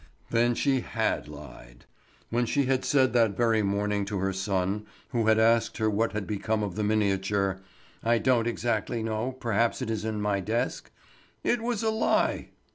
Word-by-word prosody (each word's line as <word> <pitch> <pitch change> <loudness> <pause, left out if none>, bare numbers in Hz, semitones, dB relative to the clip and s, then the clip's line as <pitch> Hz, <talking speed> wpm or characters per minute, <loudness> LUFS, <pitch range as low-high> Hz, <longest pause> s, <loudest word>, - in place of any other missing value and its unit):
Then 120 +1 +3
she 135 0 +2
had - - -1
lied! 70 -5 -12 0.5
When 120 +1 +1
she 140 +3 +1
had 130 0 +1
said 130 -3 +3
that 115 -5 +3
very 115 -2 +3
morning 100 0 0
to 100 0 -3
her 95 +1 -1
son 95 +2 -1 0.2
who 115 -5 0
had 110 0 +5
asked 115 +1 +3
her 110 -1 +1
what 110 +2 0
had 105 -2 -3
become 105 +1 -1
of 100 -3 -3
the 105 - -2
miniature: 100 -2 +1 0.4
"I 115 +1 +3
don't 115 0 +2
exactly 115 -1 -1
know—perhaps 115 0 -1
it 125 -4 -3
is 110 -2 -2
in 110 -1 -2
my 105 -1 0
desk"—it 120 - -4
was 235 -2 -2
a 220 - +2
lie! 220 - +1
110 Hz, 170 wpm, -27 LUFS, 100-120 Hz, 0.5 s, had